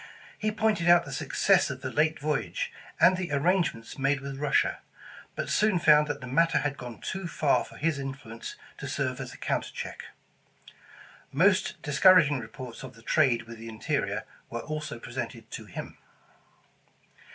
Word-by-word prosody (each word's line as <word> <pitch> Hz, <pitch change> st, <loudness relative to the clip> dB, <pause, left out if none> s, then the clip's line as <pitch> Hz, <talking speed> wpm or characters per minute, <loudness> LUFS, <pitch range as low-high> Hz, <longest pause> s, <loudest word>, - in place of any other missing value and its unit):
He 215 Hz, 0 st, -1 dB
pointed 215 Hz, -5 st, +1 dB
out 175 Hz, 0 st, +7 dB
the 145 Hz, -, -8 dB
success 135 Hz, -, +2 dB
of -, -, -6 dB
the -, -, -4 dB
late 155 Hz, +1 st, +2 dB
voyage, 465 Hz, -, -2 dB, 0.3 s
and 185 Hz, -, +6 dB
the 180 Hz, -4 st, -3 dB
arrangements 145 Hz, -6 st, 0 dB
made 140 Hz, +1 st, +2 dB
with 135 Hz, 0 st, -6 dB
Russia, 145 Hz, -1 st, +2 dB, 0.6 s
but -, -, -3 dB
soon 210 Hz, -3 st, +3 dB
found 150 Hz, -3 st, +5 dB
that 145 Hz, -1 st, -3 dB
the -, -, -6 dB
matter 165 Hz, +7 st, +3 dB
had 145 Hz, -1 st, 0 dB
gone 125 Hz, -4 st, -8 dB
too 190 Hz, -2 st, -4 dB
far 150 Hz, -3 st, +2 dB
for -, -, -13 dB
his 155 Hz, -2 st, 0 dB
influence 135 Hz, -4 st, -7 dB, 0.2 s
to -, -, -5 dB
serve -, -, -2 dB
as -, -, -6 dB
a -, -, -11 dB
counter -, -, -1 dB
check. -, -, -6 dB, 1.3 s
Most 185 Hz, +7 st, +3 dB
discouraging 150 Hz, -1 st, +5 dB
reports 125 Hz, -2 st, -8 dB
of 130 Hz, -1 st, -9 dB
the 115 Hz, -, -17 dB
trade 125 Hz, -4 st, +3 dB
with 115 Hz, -1 st, -11 dB
the 115 Hz, 0 st, -8 dB
in 110 Hz, -, -9 dB
terior -, -, -1 dB, 0.3 s
were 115 Hz, -, -4 dB
also 155 Hz, -1 st, -5 dB
presented 115 Hz, -1 st, -6 dB
to 110 Hz, -, -6 dB
him. 95 Hz, -, -8 dB
145 Hz, 170 wpm, -28 LUFS, 130-170 Hz, 1.3 s, out